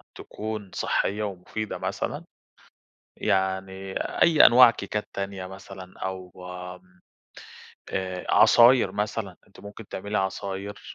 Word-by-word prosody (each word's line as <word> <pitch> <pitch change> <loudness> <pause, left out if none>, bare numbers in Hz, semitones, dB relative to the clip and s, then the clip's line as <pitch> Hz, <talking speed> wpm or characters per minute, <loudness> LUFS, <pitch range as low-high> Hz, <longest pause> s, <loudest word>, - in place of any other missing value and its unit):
تكون 105 -2 -6
صحية 105 +2 0
ومفيدة 100 +2 -5
مثلًا؟ - - -4 0.9
يعني 95 +1 -1 0.3
أي 160 -3 +7
أنواع 120 0 +8
كيكات 105 -1 -4
تانية 100 -1 -4
مثلًا 95 -1 -11
أو 95 -1 -5 0.4
آمم، 90 0 -23 0.9
آآ 95 -1 -4
عصاير 120 -4 +6
مثلًا، 105 -2 -3
أنتِ 100 - -18
ممكن 100 +1 -11
تعملي 100 +2 -3
عصاير، 95 +1 -3
100 Hz, 105 wpm, -26 LUFS, 95-105 Hz, 0.9 s, أنواع